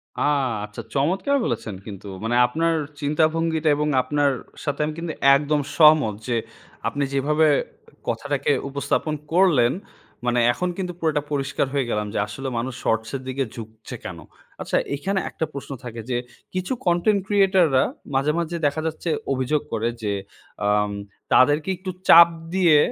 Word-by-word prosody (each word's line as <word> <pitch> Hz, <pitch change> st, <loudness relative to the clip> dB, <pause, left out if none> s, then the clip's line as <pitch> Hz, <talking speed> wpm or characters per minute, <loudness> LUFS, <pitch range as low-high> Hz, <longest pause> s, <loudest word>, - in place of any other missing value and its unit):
আ -, -, -4 dB, 0.4 s
আচ্ছা 105 Hz, +2 st, -8 dB
চমৎকার 185 Hz, -, +1 dB
বলেছেন 110 Hz, -3 st, -3 dB
কিন্তু 100 Hz, -2 st, -9 dB, 0.2 s
মানে 115 Hz, +2 st, 0 dB
আপনার 165 Hz, +6 st, 0 dB, 0.3 s
চিন্তা 150 Hz, +2 st, +2 dB
ভঙ্গিটা 160 Hz, -1 st, +1 dB
এবং 150 Hz, 0 st, 0 dB
আপনার 145 Hz, +2 st, +1 dB, 0.3 s
সাথে 145 Hz, -1 st, -2 dB
আমি 155 Hz, -, -3 dB
কিন্তু 165 Hz, -2 st, -4 dB, 0.2 s
একদম 150 Hz, +1 st, +1 dB, 0.2 s
সহমত 150 Hz, -8 st, +6 dB
যে, 120 Hz, -, 0 dB, 0.5 s
আপনি 145 Hz, -, -1 dB
যেভাবে 150 Hz, +3 st, +3 dB, 0.6 s
কথাটাকে -, -, -1 dB, 0.2 s
উপস্থাপন 140 Hz, +2 st, -1 dB, 0.2 s
করলেন। 165 Hz, -9 st, +4 dB, 0.5 s
মানে 120 Hz, 0 st, +2 dB
এখন 180 Hz, +6 st, -2 dB
কিন্তু 180 Hz, -2 st, -3 dB
পুরোটা 155 Hz, -3 st, +1 dB
পরিষ্কার 140 Hz, -1 st, 0 dB
হয়ে 135 Hz, -3 st, 0 dB
গেলাম 105 Hz, -2 st, -1 dB
যে, -, -, 0 dB
আসলে 120 Hz, +6 st, -6 dB
মানুষ 125 Hz, +3 st, -2 dB
শর্টস 110 Hz, 0 st, 0 dB
এর 135 Hz, -, -4 dB
দিকে 135 Hz, +1 st, -1 dB
ঝুঁকছে 110 Hz, -1 st, -9 dB
কেন? -, -, -6 dB, 0.4 s
আচ্ছা -, -, 0 dB, 0.2 s
এখানে 190 Hz, +7 st, -1 dB
একটা 160 Hz, -, -3 dB
প্রশ্ন 140 Hz, 0 st, -7 dB
থাকে 115 Hz, -2 st, -6 dB
যে, 120 Hz, -, 0 dB, 0.4 s
কিছু 185 Hz, +6 st, -2 dB
কনটেন্ট 180 Hz, +4 st, +3 dB
ক্রিয়েটর 195 Hz, -3 st, +4 dB
রা 130 Hz, -, +5 dB, 0.3 s
মাঝে, 135 Hz, +3 st, +2 dB
মাঝে, 170 Hz, 0 st, -2 dB
দেখা 145 Hz, +2 st, +1 dB
যাচ্ছে 160 Hz, +2 st, -4 dB, 0.2 s
অভিযোগ 130 Hz, +3 st, 0 dB
করে 115 Hz, +1 st, 0 dB
যে, 105 Hz, -1 st, 0 dB, 0.5 s
আম 105 Hz, 0 st, +2 dB, 0.4 s
তাদেরকে 145 Hz, +6 st, +4 dB
একটু 185 Hz, +1 st, -5 dB, 0.2 s
চাপ 170 Hz, 0 st, +10 dB, 0.3 s
দিয়ে 175 Hz, -5 st, +5 dB
145 Hz, 155 wpm, -23 LUFS, 120-165 Hz, 0.6 s, চাপ